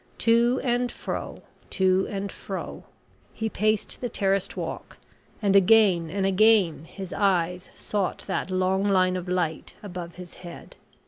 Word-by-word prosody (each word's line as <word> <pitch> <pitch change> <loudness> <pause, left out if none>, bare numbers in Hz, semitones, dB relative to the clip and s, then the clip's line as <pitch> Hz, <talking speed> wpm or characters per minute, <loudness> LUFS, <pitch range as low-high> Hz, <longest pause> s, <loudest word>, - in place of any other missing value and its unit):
To 235 +2 +3
and 245 -1 0
fro - - -6 0.3
to 190 0 +2
and 200 -1 -4
fro - - -7 0.5
he 220 0 -2
paced 215 -1 -1
the 245 - -2
terraced 195 -2 0
walk, - - -6 0.5
and 200 -1 +3
again 195 -4 +5
and 195 +3 -1
again 195 -5 +3
his 190 +1 -8
eyes 180 -2 0
sought 200 -3 -2
that - - -2
long 185 +1 +1
line 185 -2 +3
of 180 0 -4
light 175 -3 -2
above 175 -3 -7
his 180 -1 -11
head. 175 -2 -11
190 Hz, 140 wpm, -25 LUFS, 180-210 Hz, 0.5 s, again